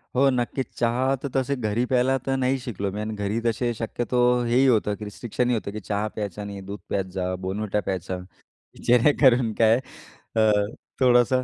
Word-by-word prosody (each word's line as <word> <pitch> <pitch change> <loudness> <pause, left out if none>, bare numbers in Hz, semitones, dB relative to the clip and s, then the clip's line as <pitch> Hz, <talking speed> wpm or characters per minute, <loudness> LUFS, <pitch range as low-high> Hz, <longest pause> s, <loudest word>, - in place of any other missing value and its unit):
हो. 135 +2 +5
नक्कीच. 125 +1 -1
चहा 125 +3 +1
तर 140 - -3
तसे 135 +1 +1
घरी 110 -1 -1
प्यायला 130 +1 +3
तर 135 - 0
नाही 130 +1 +1
शिकलो 100 -6 -4
मी 105 - -5
आणि 110 +1 -3
घरी 105 +2 -1
तसे 120 +1 0
शक्यतो 120 +2 -2 0.3
हेही 125 +3 +3
होतं, 105 -4 +2
की 105 - -9
रिस्ट्रिक्शनही 120 +4 -2
होतं, 100 -2 -4
की 110 - -5
चहा 105 +2 -2
प्यायचा 105 -1 -4
नाही, 100 -1 -7
दूध 100 +2 -7
प्यायच, 95 -1 -2 0.3
Bournvita 105 +2 -1
प्यायचा. 95 0 -3 0.7
जेणेकरून 125 -1 +4
काय 115 0 +5 0.6
अ, 110 - +3 0.6
थोडंसं, 125 0 +4
115 Hz, 170 wpm, -24 LUFS, 105-125 Hz, 0.7 s, हो